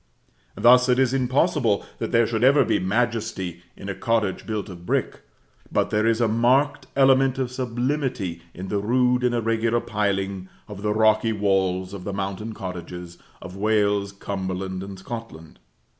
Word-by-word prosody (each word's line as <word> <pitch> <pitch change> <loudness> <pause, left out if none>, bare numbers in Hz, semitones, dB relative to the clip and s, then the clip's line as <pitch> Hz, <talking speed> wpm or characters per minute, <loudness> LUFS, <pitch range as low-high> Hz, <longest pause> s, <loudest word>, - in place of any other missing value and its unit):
Thus 125 +4 +5
it 125 - +4
is 130 -1 +2
impossible 130 - +1
that - - -3
there 115 -1 +4
should 110 +1 -1
ever 140 +3 +5
be - - +1
majesty 100 -3 -1 0.2
in 100 - -9
a 100 - -2
cottage 110 -3 -1
built 110 -2 -3
of 90 -3 -10
brick; - - -1 0.5
but - - +1
there 105 +1 +2
is 115 0 +2
a 120 - +3
marked 125 +6 +2
element 135 -1 +4
of 130 -2 -2
sublimity 125 - -2
in 95 +2 -7
the 105 - 0
rude 125 +3 +2
and 125 -1 +2
irregular 115 0 +1
piling 100 -3 -2 0.2
of 105 -2 -9
the 105 0 0
rocky 110 +1 +3
walls 95 -2 0
of 100 -2 -7
the 100 - -4
mountain 100 +3 -4
cottages 90 -2 -7 0.2
of 90 +1 -9
Wales, 100 -1 +1
Cumberland, 95 -1 -4
and 95 0 -8
Scotland. 95 - -9
110 Hz, 160 wpm, -24 LUFS, 95-120 Hz, 0.5 s, Thus